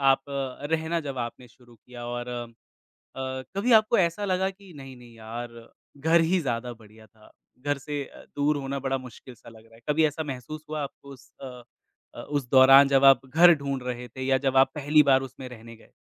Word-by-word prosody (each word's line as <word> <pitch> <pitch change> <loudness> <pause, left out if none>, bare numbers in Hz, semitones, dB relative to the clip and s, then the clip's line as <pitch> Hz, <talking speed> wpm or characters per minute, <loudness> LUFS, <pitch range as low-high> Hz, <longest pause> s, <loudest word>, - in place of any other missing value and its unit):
आप 135 -1 +4 0.5
रहना 160 +1 0
जब 135 -2 -5
आपने 120 +1 -6
शुरू 120 0 -21
किया 120 +1 -12
और 120 0 -5
अ, 120 -1 -5 1.1
कभी 235 +5 +1
आपको 215 +1 0
ऐसा 180 +3 0
लगा 190 0 0
कि 195 -1 -16
नहीं-नहीं 125 -4 -12
यार 115 +1 -9 0.3
घर 165 +3 +3
ही 175 +3 +1
ज़्यादा 120 -3 -3
बढ़िया 110 -1 -17
था, 110 +1 -22 0.3
घर 145 +1 -1
से 145 +1 -5 0.3
दूर 145 +1 +1
होना 140 0 -4
बड़ा 135 0 -2
मुश्किल 130 0 -12
सा 115 - -18
लग 110 -1 -17
रहा 115 0 -21
है। 115 - -18
कभी 160 +2 +3
ऐसा 150 +2 -3
महसूस 150 +5 -9
हुआ 155 -1 -3
आपको 140 0 -9
उस 135 +2 -17
अ 125 -2 -9 0.5
अ, - - -8
उस 145 -4 -3
दौरान 135 +1 +7
जब 135 0 +3
आप 135 -1 +6
घर 170 +5 +6
ढूँढ 140 -3 -4
रहे 125 0 -5
थे 130 - -9
या 135 0 +2
जब 135 -1 0
आप 135 0 +5
पहली 150 +1 +4
बार 135 -1 +4
उसमें 130 0 -9
रहने 115 -1 -12
गए। - - -22
135 Hz, 200 wpm, -26 LUFS, 120-150 Hz, 1.1 s, दौरान